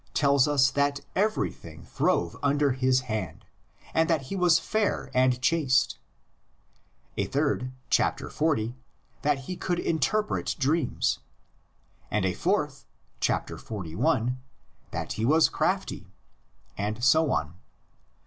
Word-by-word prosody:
tells 140 Hz, -2 st, +4 dB
us 135 Hz, -2 st, +4 dB
that 140 Hz, 0 st, 0 dB
everything 200 Hz, -, -2 dB
throve 85 Hz, -, 0 dB
under 145 Hz, 0 st, +2 dB
his 130 Hz, 0 st, +2 dB
hand, 110 Hz, -7 st, -5 dB, 0.5 s
and 160 Hz, +1 st, +2 dB
that 160 Hz, -5 st, +2 dB
he -, -, -2 dB
was 180 Hz, -3 st, +4 dB
fair 205 Hz, -7 st, -1 dB
and 130 Hz, 0 st, +3 dB
chaste; 150 Hz, -6 st, +2 dB, 1.2 s
a -, -, +1 dB
third 140 Hz, -3 st, 0 dB, 0.2 s
(xl.) -, -, +5 dB, 1.2 s
that 145 Hz, -1 st, +2 dB
he 180 Hz, +8 st, -5 dB
could 175 Hz, 0 st, -2 dB
interpret 190 Hz, +7 st, 0 dB
dreams; 145 Hz, -1 st, +1 dB, 0.9 s
and 105 Hz, -2 st, 0 dB
a 90 Hz, -, +1 dB
fourth 150 Hz, -, -1 dB, 0.3 s
(xli.) 110 Hz, +5 st, -1 dB, 0.5 s
that -, -, -4 dB
he 110 Hz, -, -3 dB
was 155 Hz, +7 st, +5 dB
crafty; -, -, -1 dB, 0.7 s
and 105 Hz, +3 st, -3 dB
so 155 Hz, +4 st, +5 dB
on. 75 Hz, -4 st, -1 dB
140 Hz, 110 wpm, -27 LUFS, 125-160 Hz, 1.2 s, xl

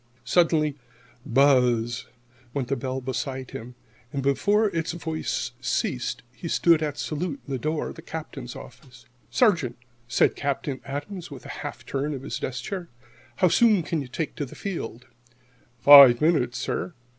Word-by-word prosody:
Suddenly 155 Hz, 0 st, +3 dB, 0.5 s
"buzz" 125 Hz, -3 st, +3 dB, 0.5 s
went 130 Hz, -4 st, -2 dB
the 140 Hz, -, +1 dB
bell 130 Hz, +1 st, -3 dB
beside 130 Hz, +1 st, -4 dB
him. 120 Hz, +2 st, -8 dB, 0.4 s
Before 200 Hz, +11 st, +2 dB
its 165 Hz, 0 st, -1 dB
voice 160 Hz, -6 st, -3 dB
ceased 130 Hz, -1 st, -2 dB
he 170 Hz, -, -7 dB
stood 165 Hz, -1 st, +4 dB
at 150 Hz, -2 st, -2 dB
salute 155 Hz, -2 st, -3 dB
in 140 Hz, -, -5 dB
the 130 Hz, -, -2 dB
door 155 Hz, +3 st, -2 dB
of -, -, -9 dB
the -, -, -9 dB
Captain's 140 Hz, -6 st, -7 dB
office. 125 Hz, 0 st, -13 dB, 0.2 s
"Sergeant," 170 Hz, -, +2 dB, 0.3 s
said 120 Hz, -, +3 dB
Captain 140 Hz, -1 st, -3 dB
Adams, 150 Hz, +6 st, -6 dB
with 140 Hz, -4 st, -10 dB
a -, -, -9 dB
half -, -, -7 dB
turn 140 Hz, +2 st, -2 dB
of 135 Hz, -, -8 dB
his -, -, -4 dB
desk 125 Hz, -1 st, -4 dB
chair, 180 Hz, -1 st, -5 dB, 0.5 s
"how 180 Hz, -, +4 dB
soon 210 Hz, 0 st, +4 dB
can 160 Hz, -1 st, -2 dB
you 135 Hz, -, -7 dB
take 150 Hz, +5 st, -4 dB
the 145 Hz, -, -3 dB
field?" 130 Hz, -, -5 dB, 0.7 s
"Five 130 Hz, -1 st, +10 dB
minutes, 150 Hz, -7 st, +2 dB
sir." 175 Hz, -, -3 dB
140 Hz, 155 wpm, -25 LUFS, 125-160 Hz, 0.7 s, Five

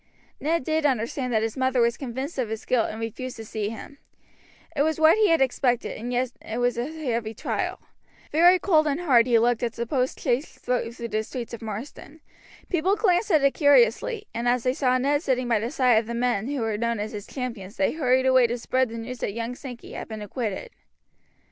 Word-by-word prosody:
Ned 325 Hz, 0 st, 0 dB
did 315 Hz, +2 st, 0 dB
understand 255 Hz, -1 st, 0 dB
that 220 Hz, -2 st, +2 dB
his 225 Hz, -1 st, -2 dB
mother 260 Hz, -1 st, +1 dB
was 235 Hz, 0 st, +3 dB
convinced 265 Hz, +4 st, -5 dB
of 240 Hz, -4 st, -1 dB
his 220 Hz, 0 st, -5 dB
guilt 240 Hz, -3 st, +1 dB
and 220 Hz, -, -6 dB
refused 235 Hz, +3 st, -5 dB
to 225 Hz, -1 st, -8 dB
see 210 Hz, -1 st, -3 dB
him; 255 Hz, +5 st, -9 dB, 0.8 s
it 280 Hz, -, +1 dB
was 315 Hz, +1 st, +1 dB
what 315 Hz, 0 st, +6 dB
he 430 Hz, -4 st, +3 dB
expected, 260 Hz, -5 st, +1 dB
and 240 Hz, +3 st, -5 dB
yet 250 Hz, 0 st, 0 dB
it 220 Hz, -, -5 dB
was 245 Hz, 0 st, +1 dB
a 240 Hz, +2 st, -2 dB
heavy 235 Hz, -8 st, -3 dB
trial. -, -, -3 dB, 0.5 s
Very 350 Hz, +4 st, +6 dB
cold 320 Hz, -4 st, +3 dB
and 295 Hz, +3 st, -1 dB
hard 255 Hz, -8 st, +4 dB
he 240 Hz, -2 st, +4 dB
looked 235 Hz, 0 st, +2 dB
as 235 Hz, -2 st, -1 dB
the 235 Hz, +1 st, -3 dB
postchaise 255 Hz, +1 st, -1 dB
drove 235 Hz, -2 st, -2 dB
through 235 Hz, -1 st, -6 dB
the 215 Hz, -, 0 dB
streets 235 Hz, +2 st, -7 dB
of 235 Hz, -, -7 dB
Marsden. 230 Hz, +7 st, -7 dB, 0.5 s
People 365 Hz, +3 st, +1 dB
glanced 400 Hz, -1 st, +2 dB
at 310 Hz, -6 st, +4 dB
it 275 Hz, -, +4 dB
curiously, 285 Hz, -, +3 dB
and 235 Hz, +1 st, -2 dB
as 245 Hz, -1 st, +2 dB
they 255 Hz, -, +1 dB
saw 255 Hz, -2 st, +2 dB
Ned 285 Hz, +3 st, +1 dB
sitting 255 Hz, -5 st, 0 dB
by 230 Hz, -3 st, +2 dB
the 230 Hz, +3 st, -2 dB
side 255 Hz, -5 st, +4 dB
of 220 Hz, -, -6 dB
the 235 Hz, -, -4 dB
men 240 Hz, -3 st, 0 dB
who 280 Hz, -2 st, -2 dB
were 220 Hz, -2 st, -1 dB
known 235 Hz, -1 st, -1 dB
as 210 Hz, +1 st, -3 dB
his 210 Hz, -1 st, -7 dB
champions 235 Hz, -6 st, -6 dB
they 190 Hz, -, +2 dB
hurried 260 Hz, -4 st, +2 dB
away 260 Hz, -2 st, +5 dB
to 240 Hz, +1 st, -2 dB
spread 255 Hz, +1 st, 0 dB
the 230 Hz, -, -7 dB
news 240 Hz, +2 st, -6 dB
that 200 Hz, -, -2 dB
young 230 Hz, +2 st, -3 dB
Sankey 250 Hz, -2 st, -9 dB
had -, -, -6 dB
been 220 Hz, -2 st, -6 dB
acquitted. 230 Hz, -, -4 dB
250 Hz, 220 wpm, -25 LUFS, 230-280 Hz, 0.8 s, what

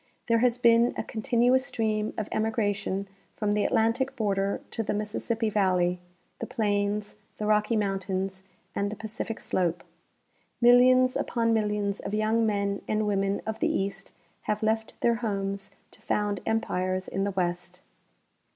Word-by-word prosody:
There 230 Hz, 0 st, +3 dB
has 245 Hz, 0 st, +3 dB
been 235 Hz, 0 st, +4 dB
a -, -, -1 dB
continuous 240 Hz, +3 st, +2 dB
stream 215 Hz, -4 st, -1 dB
of 215 Hz, -, -2 dB
emigration 205 Hz, -3 st, -1 dB, 0.3 s
from 210 Hz, -1 st, -1 dB
the 205 Hz, 0 st, +2 dB
Atlantic 250 Hz, +5 st, +1 dB
border 200 Hz, -4 st, 0 dB
to -, -, -2 dB
the 210 Hz, -, -2 dB
Mississippi 220 Hz, +2 st, -2 dB
valley, 185 Hz, -4 st, +2 dB, 0.4 s
the -, -, -4 dB
plains, 205 Hz, -1 st, -1 dB, 0.2 s
the 210 Hz, -, -3 dB
Rocky 210 Hz, +2 st, +2 dB
mountains, 195 Hz, -2 st, -2 dB, 0.3 s
and 200 Hz, 0 st, -1 dB
the -, -, -4 dB
Pacific 225 Hz, +1 st, -5 dB
slope. 175 Hz, -2 st, -1 dB, 0.8 s
Millions 255 Hz, +1 st, +6 dB
upon 230 Hz, -1 st, +1 dB
millions 210 Hz, -2 st, 0 dB
of 205 Hz, -, -4 dB
young 220 Hz, +1 st, +2 dB
men 200 Hz, -1 st, -1 dB
and 215 Hz, 0 st, 0 dB
women 195 Hz, -1 st, 0 dB
of 220 Hz, 0 st, -4 dB
the -, -, +1 dB
east 195 Hz, 0 st, -3 dB, 0.3 s
have 210 Hz, +1 st, 0 dB
left 220 Hz, 0 st, -1 dB
their 235 Hz, -1 st, +3 dB
homes 200 Hz, -3 st, -2 dB, 0.2 s
to -, -, -17 dB
found 205 Hz, -2 st, -1 dB
empires 185 Hz, -4 st, -1 dB
in 195 Hz, -, -2 dB
the 200 Hz, -, 0 dB
west. 180 Hz, -1 st, -3 dB
210 Hz, 150 wpm, -27 LUFS, 195-225 Hz, 0.8 s, Millions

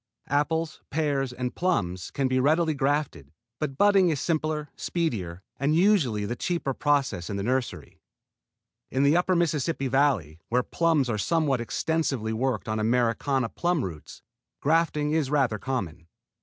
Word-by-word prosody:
Apples, 155 Hz, +3 st, 0 dB
pears, 140 Hz, -4 st, 0 dB
and 125 Hz, -1 st, -4 dB
plums 90 Hz, -, -1 dB
can 135 Hz, -1 st, -1 dB
be 130 Hz, 0 st, +1 dB
readily 155 Hz, +4 st, +2 dB
grafted, 140 Hz, -, -1 dB, 0.3 s
but 135 Hz, -3 st, -3 dB
budding 195 Hz, -2 st, +5 dB
is 155 Hz, -4 st, 0 dB
simpler, 155 Hz, -1 st, -1 dB
speedier, 100 Hz, -, -3 dB, 0.2 s
and 145 Hz, +3 st, +2 dB
usually 160 Hz, -, +3 dB
the 120 Hz, -, -3 dB
cheaper 170 Hz, -2 st, -2 dB
process 135 Hz, -, 0 dB
in 100 Hz, -, -3 dB
the 100 Hz, -, -3 dB
nursery. 120 Hz, -, -3 dB, 0.9 s
In 135 Hz, +2 st, +1 dB
the 145 Hz, +3 st, +4 dB
upper 180 Hz, +1 st, +2 dB
Mississippi 160 Hz, -4 st, 0 dB
Valley, 125 Hz, -, +1 dB
where 125 Hz, +1 st, +2 dB
plums 160 Hz, -4 st, +1 dB
are 110 Hz, -3 st, -1 dB
somewhat 145 Hz, -1 st, +1 dB
extensively 135 Hz, -4 st, -1 dB
worked 120 Hz, -2 st, -1 dB
on 110 Hz, 0 st, -1 dB
Americana 120 Hz, +3 st, +1 dB
plum 175 Hz, -1 st, 0 dB
roots, 80 Hz, -5 st, -9 dB, 0.4 s
grafting 150 Hz, -1 st, +1 dB
is 155 Hz, -4 st, +1 dB
rather 135 Hz, -7 st, +1 dB
common. 90 Hz, -12 st, -4 dB
135 Hz, 145 wpm, -26 LUFS, 115-155 Hz, 0.9 s, budding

